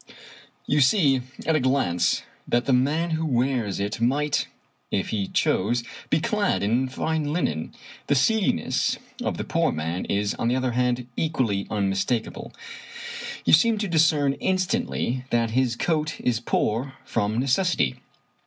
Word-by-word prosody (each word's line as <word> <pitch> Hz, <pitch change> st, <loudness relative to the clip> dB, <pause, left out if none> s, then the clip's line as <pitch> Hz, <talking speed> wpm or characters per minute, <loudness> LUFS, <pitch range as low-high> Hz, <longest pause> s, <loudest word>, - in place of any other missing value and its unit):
You 145 Hz, +1 st, +2 dB
see 135 Hz, -3 st, +4 dB, 0.2 s
at 160 Hz, -, +2 dB
a -, -, +3 dB
glance 125 Hz, -, +1 dB, 0.2 s
that 120 Hz, 0 st, +1 dB
the 135 Hz, -, +2 dB
man 150 Hz, +7 st, +1 dB
who 160 Hz, 0 st, 0 dB
wears 125 Hz, -7 st, 0 dB
it 105 Hz, +3 st, -3 dB
might, 140 Hz, +4 st, +1 dB, 0.4 s
if 95 Hz, -, -1 dB
he 100 Hz, -3 st, -1 dB
chose, 120 Hz, +5 st, +1 dB, 0.3 s
be 155 Hz, -, +3 dB
clad 210 Hz, -, 0 dB
in 120 Hz, +5 st, +1 dB
fine 155 Hz, +2 st, -1 dB
linen. 80 Hz, -, -2 dB, 0.3 s
The 145 Hz, -, +3 dB
seediness 215 Hz, -, +1 dB, 0.3 s
of -, -, -2 dB
the -, -, -3 dB
poor 165 Hz, 0 st, +1 dB
man 80 Hz, +3 st, -3 dB
is, 100 Hz, 0 st, 0 dB
on -, -, -2 dB
the 120 Hz, -, +2 dB
other 130 Hz, -1 st, 0 dB
hand, 125 Hz, 0 st, 0 dB
equally 120 Hz, -11 st, 0 dB
unmistakable. 100 Hz, +3 st, -1 dB, 0.9 s
You -, -, +3 dB
seem 220 Hz, +8 st, +5 dB
to 205 Hz, 0 st, -1 dB
discern 155 Hz, -4 st, +3 dB
instantly 185 Hz, -, -1 dB
that 115 Hz, -1 st, +1 dB
his 125 Hz, 0 st, +1 dB
coat 155 Hz, +3 st, -1 dB
is 120 Hz, -2 st, 0 dB
poor 120 Hz, +3 st, -1 dB
from 110 Hz, -3 st, -1 dB
necessity. 130 Hz, -, +1 dB
130 Hz, 145 wpm, -25 LUFS, 115-155 Hz, 0.9 s, seem